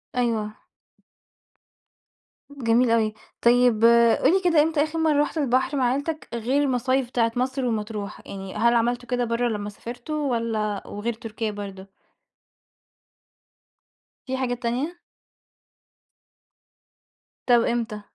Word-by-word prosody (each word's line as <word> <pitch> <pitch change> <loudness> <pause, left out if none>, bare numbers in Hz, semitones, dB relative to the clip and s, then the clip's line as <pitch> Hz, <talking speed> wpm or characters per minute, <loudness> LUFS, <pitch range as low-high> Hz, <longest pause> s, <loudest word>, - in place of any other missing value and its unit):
أيوه. 225 -4 0 2.0
جميل 245 -3 +2
أوي، 220 -2 +2 0.3
طيب 240 -2 +4 0.4
قُل 275 - +5
لي 385 - +3
كده، 330 -4 +4
إمتى 310 -2 +1
آخر 315 +1 -3
مرة 305 -2 +3
رُحت 305 - -2
البحر 265 0 +1
مع 260 - +2
عيلتك، 295 +4 -3
غير 245 +5 0
المصايف 255 -1 +1
بتاعت 230 -1 0
مصر 260 +1 -1
ومطروح 215 -3 -4
يعني، 195 -1 -8
هل 235 +3 +3
عملتوا 240 +1 0
كده 245 -1 0
برّا 235 +1 0
لمّا 210 -2 -3
سافرتوا، 260 +7 -4
والّا 220 -3 -2
وغير 215 +3 -3
تركيا 225 0 -5
برضو؟ 200 -2 -8 2.4
في 260 0 -2
حاجات 245 -2 -2
تانية؟ 255 +9 -1 2.5
طَب 240 -1 +5
إمتى؟ 230 -3 -2
240 Hz, 115 wpm, -24 LUFS, 225-265 Hz, 2.5 s, قُل